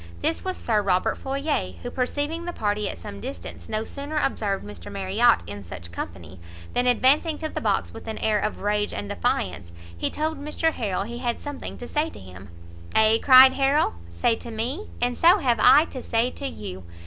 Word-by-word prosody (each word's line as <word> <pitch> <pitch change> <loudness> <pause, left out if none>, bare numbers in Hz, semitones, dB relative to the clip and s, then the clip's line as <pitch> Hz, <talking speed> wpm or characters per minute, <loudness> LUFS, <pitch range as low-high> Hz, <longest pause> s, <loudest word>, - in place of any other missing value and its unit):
This - - 0
was 370 -1 -3
Sir 215 -3 +1
Robert 185 -2 +1
Floyer, 270 - -2
who - - -5
perceiving 290 +6 -2
the 350 - -4
party 210 -4 -1
at - - -6
some 100 +4 -9
distance, 85 -2 -7
no 215 - -1
sooner 285 +6 -6
observed 205 - 0
Mr 100 -3 -9
Marriot 200 +5 +3
in 100 -1 -7
such 85 -1 -9
company, 85 +1 -7 0.3
than 245 0 +1
advancing 280 +6 +3
to 315 - -4
the - - -4
box - - 0
with - - -10
an 220 - -4
air 215 -1 +1
of 215 - -3
rage 205 0 0
and 100 0 -5
defiance, 85 0 -2 0.2
he 85 - -1
told 310 -1 -3
Mr 320 +2 0
Harrel 200 -5 -2
he 235 +3 -6
had 240 -2 -2
something 290 -1 -7
to 245 - -8
say 305 +4 0
to - - -12
him. 95 +1 -12 0.5
"Ay," 220 +1 +5
cried 260 0 +9
Harrel, 275 +2 +2 0.2
"say 85 - +1
to - - -9
me? 245 - -3
and 245 0 -1
so 350 +4 +7
have 245 - +1
I 295 +7 +7
to 260 - -6
say 230 +2 0
to 280 - -5
you! 95 - -7
230 Hz, 200 wpm, -25 LUFS, -, 0.5 s, cried